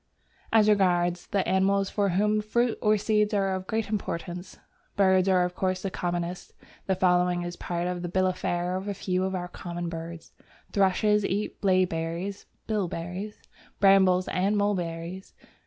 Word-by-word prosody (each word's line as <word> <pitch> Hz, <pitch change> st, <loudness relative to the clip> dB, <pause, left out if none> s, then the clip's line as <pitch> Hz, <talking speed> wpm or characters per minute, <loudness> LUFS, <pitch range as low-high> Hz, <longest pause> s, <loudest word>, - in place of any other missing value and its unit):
As 220 Hz, -2 st, +5 dB
regards 175 Hz, -4 st, +2 dB
the 200 Hz, -2 st, 0 dB
animals 195 Hz, +1 st, +2 dB
for 200 Hz, -1 st, +1 dB
whom 210 Hz, +4 st, +2 dB
fruit 235 Hz, +2 st, +1 dB
or 215 Hz, 0 st, +3 dB
seeds 210 Hz, 0 st, +1 dB
are 195 Hz, -1 st, +1 dB
of 185 Hz, 0 st, -4 dB
great 220 Hz, 0 st, -1 dB
importance, 180 Hz, -3 st, -4 dB, 0.4 s
birds 190 Hz, -1 st, +4 dB
are 180 Hz, -1 st, +4 dB
of 180 Hz, -, -4 dB
course 185 Hz, 0 st, -1 dB
the 195 Hz, -, -2 dB
commonest. 175 Hz, 0 st, -3 dB, 0.3 s
The 190 Hz, -, +2 dB
following 180 Hz, -1 st, +2 dB
is 175 Hz, 0 st, -5 dB
part 175 Hz, 0 st, -3 dB
of 180 Hz, -1 st, -2 dB
the 175 Hz, -, -4 dB
bill 185 Hz, +1 st, +1 dB
of 185 Hz, -1 st, +1 dB
fare 175 Hz, +1 st, -1 dB
of 190 Hz, +2 st, -4 dB
a 200 Hz, -, -2 dB
few 185 Hz, -1 st, -1 dB
of 190 Hz, 0 st, -2 dB
our 180 Hz, -1 st, -3 dB
common 175 Hz, -1 st, -5 dB
birds: 165 Hz, 0 st, -7 dB, 0.4 s
Thrushes 210 Hz, +2 st, +2 dB
eat 200 Hz, +2 st, -2 dB
blaeberries 185 Hz, 0 st, 0 dB, 0.2 s
(bilberries), 190 Hz, 0 st, -4 dB, 0.4 s
brambles 190 Hz, -2 st, +5 dB
and 195 Hz, +3 st, +1 dB
mulberries. 180 Hz, -2 st, -2 dB
185 Hz, 160 wpm, -27 LUFS, 175-200 Hz, 0.4 s, As